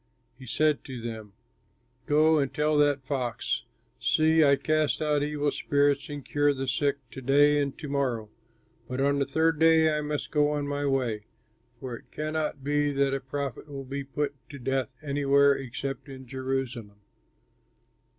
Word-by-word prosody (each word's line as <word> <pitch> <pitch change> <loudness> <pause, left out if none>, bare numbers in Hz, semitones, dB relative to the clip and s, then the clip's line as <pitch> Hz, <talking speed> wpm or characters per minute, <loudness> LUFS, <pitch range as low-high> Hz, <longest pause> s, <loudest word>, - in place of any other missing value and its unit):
He 130 - -13
said 155 +4 +1
to 130 -3 -6
them, 110 -3 -7 0.7
"Go 155 +1 +4
and 140 -2 0
tell 150 +1 +1
that 145 -2 +2
fox, 125 -4 -2 0.3
'See, 160 0 +4
I 140 -1 +6
cast 155 +1 +1
out 150 -2 +1
evil 145 0 0
spirits 145 0 +1
and 145 -2 -6
cure 145 -1 +2
the 135 0 -4
sick 140 +2 +1
to 135 - -8
day 145 +3 +4
and 140 -1 -3
to 150 - -7
morrow, 125 -6 -1 0.6
but 125 +1 -3
on 140 +1 +2
the 140 - 0
third 160 +2 +1
day 160 -1 +5
I 150 - -1
must 150 0 -3
go 150 -1 +3
on 145 -1 -2
my 145 0 -1
way; 120 -6 -1 0.5
for 125 -2 -5
it - - -14
cannot 155 -2 -3
be 145 +1 +1
that 140 0 +1
a 135 - 0
prophet 135 0 -5
will 135 -1 -6
be 140 +2 -4
put 140 +2 -2 0.2
to 145 - -8
death 135 0 -2
anywhere 140 0 +4
except 135 +1 -5
in 130 -1 -9
Jerusalem.'" 130 -5 -4
140 Hz, 170 wpm, -27 LUFS, 135-150 Hz, 0.7 s, I